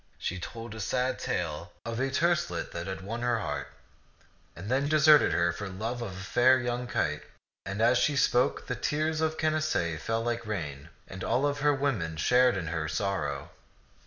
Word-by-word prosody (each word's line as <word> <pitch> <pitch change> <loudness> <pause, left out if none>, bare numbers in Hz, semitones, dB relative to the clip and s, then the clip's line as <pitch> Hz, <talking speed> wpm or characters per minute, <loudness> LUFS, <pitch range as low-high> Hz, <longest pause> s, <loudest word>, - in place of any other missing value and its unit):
She 90 - -3
told 115 +4 -7
a 110 - -8
sad 125 +5 -1
tale 85 0 -3
of 115 0 -3
a 135 +1 +1
terce 170 - +2
let 85 -1 -4
that 85 +2 -5
had 95 0 -4
won 115 +5 -5
her 120 -1 +1
heart, 105 - -3 0.9
and 95 +4 -8
then 135 +4 +1
deserted 155 -1 +6
her 85 +1 +2
for 95 +3 -5
love 110 +6 -4
of 105 -5 -4
a 95 - -7
fair 125 +5 +4
young 120 0 -2
kite; 75 -9 -1 0.5
and 100 +3 -1
as 120 +1 +5
she 150 - +2
spoke, 125 -3 +2
the - - -2
tears 155 +5 -1
of 160 0 0
Canacee 155 - 0
fell 115 +7 -2
like 120 0 -1
rain, 75 -8 -4 0.2
and 95 -1 -8
all 140 +4 +1
her 145 +1 +2
women 110 - -1
shared 125 +6 +4
in 90 - -3
her 80 -2 -2
sorrow. 80 -5 -2
115 Hz, 190 wpm, -29 LUFS, 90-130 Hz, 0.9 s, deserted